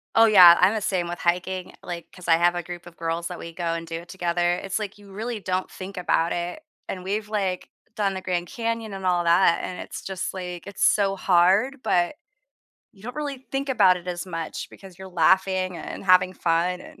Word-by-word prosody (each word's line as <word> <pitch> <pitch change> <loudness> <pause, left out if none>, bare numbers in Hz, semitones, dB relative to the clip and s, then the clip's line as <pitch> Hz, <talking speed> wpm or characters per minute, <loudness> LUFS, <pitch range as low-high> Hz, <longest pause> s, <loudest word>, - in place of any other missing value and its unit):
Oh, 225 - +7
yeah, 180 -6 +9
I'm 185 +4 +5
the 215 - -2
same 180 -3 -1
with 175 - -5
hiking, 180 +1 -1
like, 170 -1 -6
'cause 180 -1 -12
I 165 - +5
have 175 +1 +3
a 175 - -3
group 175 0 -8
of 170 - -14
girls 165 +1 -2
that 180 - -7
we 165 0 -8
go 170 -1 -2
and 165 0 -4
do 165 0 -5
it 175 - -17
together. 175 -1 0
It's, 190 +2 -3
like, 210 -2 -6
you 205 -1 -16
really 220 +3 -4
don't 185 -1 -2
think 190 +1 -9
about 170 -2 +1
it, 175 - -4 0.3
and 185 -1 -5
we've, 210 +2 -3
like, 195 -4 -2 0.3
done 200 -3 0
the 190 - -5
Grand 175 -1 -2
Canyon 230 -1 -3
and 190 -1 -6
all 175 -1 +2
that, 170 0 +4
and 180 - -5
it's - - -7
just, 190 -1 -4
like, 180 -2 -6
it's 200 - -4
so 195 -2 +3
hard, 195 +9 +3
but 175 +8 +1 0.8
you 195 -2 -20
don't 250 +5 -7
really 280 -3 -5
think 275 +1 -2
about 195 -7 +5
it 180 0 -10
as 175 +1 -4
much 165 -3 -5
because 190 -2 -14
you're 190 - -9
laughing 185 +1 +2
and - - -7
having 185 0 +4
fun 175 +2 0
and - - -14
185 Hz, 220 wpm, -24 LUFS, 175-195 Hz, 0.8 s, yeah